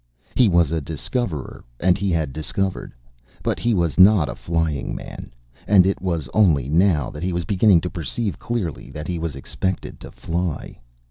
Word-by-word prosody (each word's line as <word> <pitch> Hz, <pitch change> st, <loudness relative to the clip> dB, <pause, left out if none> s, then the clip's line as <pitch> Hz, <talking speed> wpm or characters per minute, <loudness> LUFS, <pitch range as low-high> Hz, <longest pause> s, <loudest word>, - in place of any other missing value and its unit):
He 125 Hz, -5 st, +4 dB
was 85 Hz, -4 st, +3 dB
a 80 Hz, -1 st, 0 dB
Discoverer 80 Hz, -, -4 dB, 0.2 s
and 90 Hz, 0 st, +3 dB
he 100 Hz, 0 st, -1 dB
had 80 Hz, -6 st, 0 dB
Discovered. 90 Hz, +5 st, -2 dB, 0.5 s
But -, -, -1 dB
he 120 Hz, -2 st, +1 dB
was 85 Hz, -2 st, 0 dB
not 95 Hz, -4 st, +6 dB
a -, -, -3 dB
Flying 80 Hz, -4 st, -2 dB
Man, -, -, -8 dB, 0.4 s
and 95 Hz, -3 st, +6 dB
it 95 Hz, -, 0 dB
was 85 Hz, -7 st, -2 dB
only 80 Hz, -, +3 dB
now 80 Hz, -4 st, +2 dB
that 75 Hz, -, -8 dB
he 90 Hz, +1 st, -1 dB
was 85 Hz, -1 st, -2 dB
beginning 95 Hz, -1 st, +4 dB
to 90 Hz, -, -3 dB
perceive 90 Hz, -, -3 dB
clearly 105 Hz, -, -3 dB
that 75 Hz, 0 st, -7 dB
he 90 Hz, -2 st, -2 dB
was 80 Hz, -4 st, -3 dB
expected 95 Hz, +7 st, -4 dB
to -, -, -10 dB
fly. 85 Hz, -2 st, -4 dB
85 Hz, 180 wpm, -22 LUFS, 80-95 Hz, 0.5 s, not